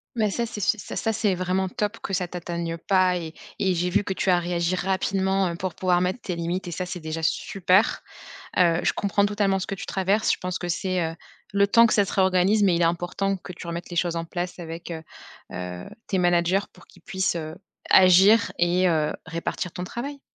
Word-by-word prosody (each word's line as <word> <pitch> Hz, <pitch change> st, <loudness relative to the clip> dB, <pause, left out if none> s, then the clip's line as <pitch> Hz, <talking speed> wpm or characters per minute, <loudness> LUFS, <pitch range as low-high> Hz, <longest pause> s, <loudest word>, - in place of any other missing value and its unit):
Mais 215 Hz, -3 st, +1 dB
ça 235 Hz, +4 st, -1 dB
c'est 225 Hz, -2 st, -7 dB
ça 205 Hz, +2 st, -1 dB
ça 225 Hz, -, 0 dB
c'est 210 Hz, -3 st, +1 dB
vraiment 185 Hz, +1 st, -1 dB
top 210 Hz, +1 st, -3 dB
que -, -, -5 dB
ça 180 Hz, -1 st, 0 dB
t'atteigne 170 Hz, -1 st, -4 dB
pas 185 Hz, +1 st, +2 dB
et 165 Hz, -2 st, -6 dB, 0.3 s
et 190 Hz, -1 st, +2 dB
j'ai 180 Hz, +1 st, 0 dB
vu 205 Hz, +3 st, +2 dB
que 195 Hz, -, -4 dB
tu 190 Hz, -, -1 dB
as 180 Hz, -1 st, +5 dB
réagi 175 Hz, 0 st, -1 dB
rapidement, 190 Hz, 0 st, 0 dB
heu, 170 Hz, -, -4 dB
pour 180 Hz, +1 st, -4 dB
pouvoir 180 Hz, -1 st, +1 dB
mettre 185 Hz, +6 st, -1 dB
tes 180 Hz, -, -4 dB
limites 170 Hz, +2 st, -3 dB
et -, -, -5 dB
ça 180 Hz, +2 st, -3 dB
c'est 180 Hz, 0 st, -6 dB
déjà 160 Hz, 0 st, -5 dB
super! 190 Hz, +5 st, +2 dB, 0.6 s
Heu, 175 Hz, -2 st, +4 dB
je -, -, +2 dB
comprends 200 Hz, 0 st, +1 dB
totalement 205 Hz, -2 st, +1 dB
ce 185 Hz, -, -4 dB
que 200 Hz, -, -3 dB
tu 195 Hz, -, -7 dB
traverses, 195 Hz, +3 st, +1 dB
je -, -, 0 dB
pense 180 Hz, -1 st, -3 dB
que 175 Hz, -, -4 dB
c'est, 185 Hz, +1 st, -1 dB
heu, -, -, -10 dB, 0.4 s
le 200 Hz, 0 st, +3 dB
temps 230 Hz, +3 st, +6 dB
que -, -, 0 dB
ça 205 Hz, -, +4 dB
se -, -, -6 dB
réorganise, 190 Hz, +2 st, +3 dB
mais 190 Hz, -3 st, +4 dB
il 170 Hz, -, 0 dB
est -, -, +5 dB
important 175 Hz, +4 st, -1 dB
que 180 Hz, -, -9 dB
tu 175 Hz, -1 st, -10 dB
remettes 170 Hz, +1 st, -5 dB
les 175 Hz, -, -5 dB
choses 170 Hz, 0 st, +1 dB
en 165 Hz, -, -2 dB
place 175 Hz, +1 st, -5 dB
avec, 165 Hz, 0 st, -7 dB
heu 160 Hz, -1 st, -6 dB, 0.5 s
heu, 90 Hz, 0 st, -6 dB, 0.2 s
tes 195 Hz, -, 0 dB
managers 175 Hz, +2 st, +2 dB
pour -, -, -18 dB
qu'ils 180 Hz, -, -20 dB
puissent, 190 Hz, +1 st, -1 dB
heu, 160 Hz, -1 st, -5 dB, 0.3 s
agir 190 Hz, +5 st, +6 dB
et 175 Hz, +2 st, +3 dB
heu, 155 Hz, -3 st, +1 dB
répartir 165 Hz, +2 st, -4 dB
ton 180 Hz, -, -5 dB
travail. 275 Hz, +9 st, -6 dB
185 Hz, 225 wpm, -25 LUFS, 170-195 Hz, 0.6 s, temps